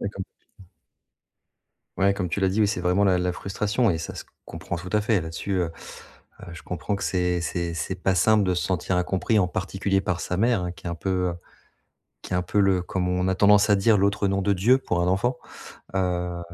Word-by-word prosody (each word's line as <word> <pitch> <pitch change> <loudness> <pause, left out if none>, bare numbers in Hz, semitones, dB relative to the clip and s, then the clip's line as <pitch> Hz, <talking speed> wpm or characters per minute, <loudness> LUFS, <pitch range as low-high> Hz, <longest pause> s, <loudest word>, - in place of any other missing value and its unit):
Ouais, 100 - -2
comme 100 -1 -6
tu - - -45
dis, 95 - -15
mmh. - - -24 1.3
Ouais, 100 +1 +3
comme 90 -3 -3
tu 85 - -2
l'as 95 - +2
dit, 100 +4 +1
oui, 105 - +4
c'est 100 - -2
vraiment 90 +3 +2
la 95 -2 +3
la 90 0 -1
frustration 105 +5 0
et 80 - -2
ça 80 - -6
se - - -7 0.2
comprend 85 - -6
tout 90 +1 -8
à 105 - +3
fait. 110 -2 +2
Là-dessus, 80 +4 -5
heu, 85 -2 -1 0.8
heu, 85 - -9
je 85 - -10
comprends 90 +3 -3
que 100 - -5
c'est 90 -1 0
c'est 85 +1 -3
c'est 85 +3 -3
pas 95 0 +2
simple 105 +3 +4
de 90 - +1
se - - -1
sentir 95 0 -1
incompris. 95 +4 +1
En 90 - +2
particulier 95 +2 -1
par 90 -3 -2
sa 90 - -3
mère, 115 -3 +2
hein, 90 - -3
qui - - -17
est - - -2
un 85 - -3
peu, 90 +4 -4 0.2
heu, 85 - -3 0.9
qui - - -6
est - - +2
un - - +1
peu 105 - 0
le 95 -2 +3
comme 90 0 -2
on 90 +1 0
a 95 - +1
tendance 105 +2 +5
à 105 - +6
dire, 105 +2 +4
l'autre 100 +1 +1
nom 100 0 0
de 100 +1 +1
Dieu, 115 +8 +4
pour 90 -9 -1
un 90 - +1
enfant. 105 +7 +1 0.6
Heu, 90 -2 -1
95 Hz, 245 wpm, -25 LUFS, 90-100 Hz, 1.3 s, à